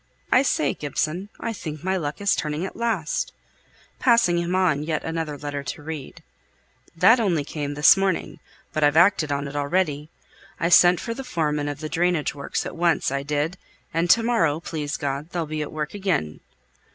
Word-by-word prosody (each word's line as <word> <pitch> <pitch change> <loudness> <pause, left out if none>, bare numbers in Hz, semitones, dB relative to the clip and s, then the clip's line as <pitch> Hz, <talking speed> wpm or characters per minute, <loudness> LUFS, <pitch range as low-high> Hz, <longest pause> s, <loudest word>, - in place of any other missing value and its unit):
I 255 - +6
say, 150 - +1
Gibson, 155 +6 -3
I 230 - -3
think 155 -6 -7
my 190 +1 0
luck 155 -1 -3
is 200 - +3
turning 150 +3 -2
at - - -7
last," 220 -9 -1 0.7
passing 230 -9 +4
him 170 +1 -1
on 180 -6 +2
yet 155 0 -2
another 160 -2 -3
letter 145 0 -4
to 140 +2 -6
read. 155 -3 -7 0.7
"That 195 +9 +6
only 175 -9 +1
came 145 0 -4
this 150 +3 +7
morning; 195 -3 -1 0.3
but 155 - 0
I've 145 +1 +4
acted 170 -4 +4
on 140 0 -1
it 140 - -8
already, 150 0 0 0.5
I 170 - +1
sent 175 0 +6
for 230 - -4
the 270 - -6
foreman 150 - -1
of 145 +1 -6
the 155 - -3
drainage 165 -1 0
works 140 -1 -3
at - - -6
once, 170 -4 +1
I 140 0 -1
did; 150 +5 -2 0.3
and 165 +2 0
to 230 +5 +6
morrow, 165 -11 +2
please 150 -3 -4
God, 140 +1 -3
they'll 170 -2 -2
be 155 0 -4
at 150 - -4
work 150 -1 -4
again." 185 - -1
160 Hz, 190 wpm, -24 LUFS, 145-180 Hz, 0.7 s, this